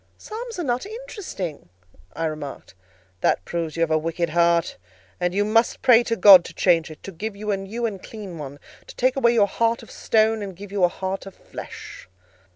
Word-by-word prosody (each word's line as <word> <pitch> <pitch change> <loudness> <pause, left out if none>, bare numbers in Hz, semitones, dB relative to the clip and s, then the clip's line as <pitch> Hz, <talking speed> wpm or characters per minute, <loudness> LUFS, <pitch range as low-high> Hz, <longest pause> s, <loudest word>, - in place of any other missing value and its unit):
"Psalms 455 +1 -7
are 350 - -2
not 245 -3 -1
interesting," 410 - -7 0.4
I 165 - -2
remarked. 150 -9 -6 0.5
"That 90 - +1
proves 165 -2 -3
you - - -1
have 165 -1 +2
a 155 - +3
wicked 165 +1 -2
heart; 170 0 +2 0.4
and 180 0 0
you 205 +3 +1
must 225 +2 +2
pray 245 -3 +7
to 230 - 0
God 195 -5 +9
to - - -10
change 165 -3 +3
it: 155 - -12
to 195 - -7
give 200 +4 -5
you 210 +1 -3
a 200 - +1
new 210 +5 -4
and 200 -5 -4
clean 200 -7 -9
one: 140 -1 -7 0.3
to - - -11
take 255 +1 +2
away 240 -3 +3
your 210 -3 +5
heart 230 +3 0
of - - -14
stone 220 0 +2
and 195 -3 -6
give 200 +2 -10
you 200 -2 0
a - - +7
heart 190 +2 -5
of 195 - -11
flesh." - - -10
195 Hz, 210 wpm, -23 LUFS, 170-230 Hz, 0.5 s, God